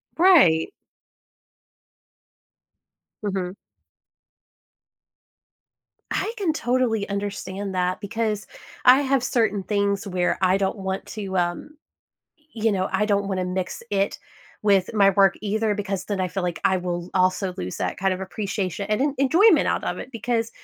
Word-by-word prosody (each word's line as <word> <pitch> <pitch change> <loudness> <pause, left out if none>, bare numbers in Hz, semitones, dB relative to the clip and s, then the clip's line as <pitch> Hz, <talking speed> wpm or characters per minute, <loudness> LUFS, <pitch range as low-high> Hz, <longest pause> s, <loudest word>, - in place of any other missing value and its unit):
Right. 315 - +5 2.5
Mhm. 190 -3 -2 2.6
I - - -1
can 370 -7 0
totally 240 -6 0
understand 200 -1 -4
that, 180 0 0
because 215 0 -2 0.4
I 255 +2 +8
have 270 -2 +1
certain 220 -5 +1
things 200 0 0
where 180 -2 0
I 185 0 +4
don't 195 +2 -1
want 190 -1 -4
to, 195 -3 -4
um 175 - -1 0.8
y 220 - -7
you 225 - +4
know, 190 -1 0
I 190 +2 +1
don't 200 -1 +1
wanna 185 -2 -1
mix 180 +2 -3
it 200 -1 0 0.4
with 200 -2 +3
my 200 -3 +5
work 195 -1 +4
either, 215 +1 0
because 195 -2 -3
then 200 -2 -2
I 185 - +1
feel 185 +2 -3
like 175 -1 -3
I 190 -1 +3
will 175 0 -4
also 185 0 +1
lose 90 0 -5
that 90 - -3
kind 190 0 +1
of 185 - -4
appreciation 195 -1 -3
and 215 +2 0
en 285 -1 0
enjoyment 335 +11 +5
out - - -1
of - - -3
it, - - -8
because 230 -1 -2
200 Hz, 145 wpm, -24 LUFS, 185-220 Hz, 2.6 s, I